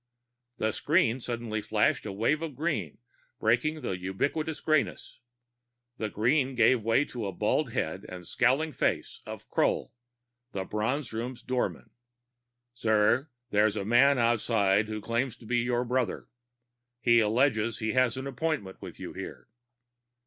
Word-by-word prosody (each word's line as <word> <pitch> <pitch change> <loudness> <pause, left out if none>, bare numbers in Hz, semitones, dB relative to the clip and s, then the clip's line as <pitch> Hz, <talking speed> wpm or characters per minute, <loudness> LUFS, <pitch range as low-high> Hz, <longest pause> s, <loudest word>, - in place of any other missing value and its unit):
The 110 - 0
screen 145 - +2
suddenly 115 -3 -3
flashed 105 0 +1
a - - -3
wave 115 +10 +1
of 160 -5 -5
green, 140 - -2 0.4
breaking 140 +8 +1
the 95 - -2
ubiquitous 140 - -2
grayness. 155 -4 0 0.8
The 110 - -1
green 130 +6 +1
gave 120 +1 +4
way 115 +6 +2
to 125 - -7
the 100 - -2
bald 110 - 0
head 90 +5 -2
and 90 -1 -8
scowling 130 - +2
face - - -1
of - - -8
Kroll, - - 0 0.6
the 95 - -2
Bronze 115 +6 -2
Room's 120 +2 -4
door 125 -1 0
man. - - -15 0.8
"Sir, 115 +4 +2 0.2
there 105 +1 +4
is 105 - -2
a 100 -2 -3
man 130 +5 +5
outside 110 -3 +2
who 110 0 -4
claims 115 +2 -1
to 115 - -15
be 120 +2 +1
your 120 0 0
brother. 125 0 -1 0.7
He 120 -1 +5
alleges 115 0 +2
he 110 -1 -1
has 130 -1 +2
an 130 - -4
appointment 140 -8 -3
with - - -9
you - - -7
here." - - -8
120 Hz, 150 wpm, -29 LUFS, 110-130 Hz, 0.8 s, man